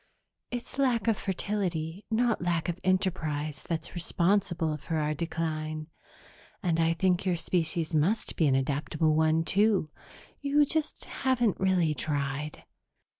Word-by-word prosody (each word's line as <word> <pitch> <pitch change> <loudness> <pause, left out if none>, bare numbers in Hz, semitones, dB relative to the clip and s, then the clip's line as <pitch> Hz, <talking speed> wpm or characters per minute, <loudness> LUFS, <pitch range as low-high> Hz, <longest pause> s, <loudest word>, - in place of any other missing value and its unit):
It's 245 +2 -5
lack 240 -6 +2
of 225 - +4
fertility, 190 -3 -2
not 230 0 +1
lack 175 -1 0
of 175 0 -3
enterprise, 160 -6 0
that's 165 -2 -3
responsible 175 -2 +1
for 160 +3 -4
our 150 0 0
decline. 155 -1 -3 0.7
And 170 -3 +1
I 165 0 +3
think 180 +1 +1
your 185 -2 +1
species 165 -1 -1
must 170 +9 +1
be 160 - +3
an 135 - +3
adaptable 150 +3 +1
one, 160 +1 +3
too; 195 -3 +2 0.5
you 290 +1 +4
just 310 +1 -2
haven't 245 -6 0
really 185 -5 +2
tried. 145 0 -2
170 Hz, 130 wpm, -29 LUFS, 155-200 Hz, 0.7 s, of